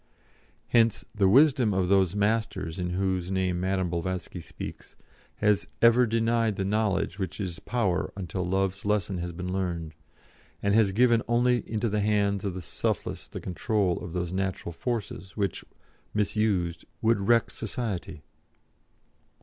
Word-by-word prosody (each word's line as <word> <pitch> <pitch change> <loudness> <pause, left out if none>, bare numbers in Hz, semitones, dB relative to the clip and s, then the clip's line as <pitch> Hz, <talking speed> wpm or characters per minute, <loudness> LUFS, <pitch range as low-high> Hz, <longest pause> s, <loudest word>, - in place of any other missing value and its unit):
Hence 115 -2 +3
the 100 -3 +3
wisdom 130 -3 +5
of 95 -1 +1
those 95 -1 +3
'Masters,' 105 -4 0
in 90 0 -1
whose 90 -1 -1
name 95 -2 0
Madame 95 0 0
Blavatsky 90 +1 -3
speaks, 85 - -9 0.4
has 105 -1 +2
ever 120 +1 +6
denied 115 -1 +1
the 95 - -2
knowledge 100 -2 0
which 95 +2 -4
is 90 -4 -4
power 100 -8 -1
until 95 -1 -3
Love's 95 +1 -1
lesson 100 -2 0
has 85 0 -3
been 90 +2 -5
learned, 85 -4 -2 0.7
and 100 - +2
has 105 -2 +4
given 115 +2 +4
only 120 +1 +3
into 110 +1 0
the 105 -1 0
hands 100 -1 +1
of 95 -3 -2
the 90 - -6
selfless - - -2
the - - -7
control 95 0 0
of 85 - -7
those 90 -1 -2
natural 95 -2 -2
forces 105 0 -4
which, 100 -2 -1 0.5
misused, 100 -5 0 0.2
would 115 -1 +3
wreck 115 +4 +3
society." 100 -8 -4
100 Hz, 145 wpm, -27 LUFS, 90-110 Hz, 0.7 s, ever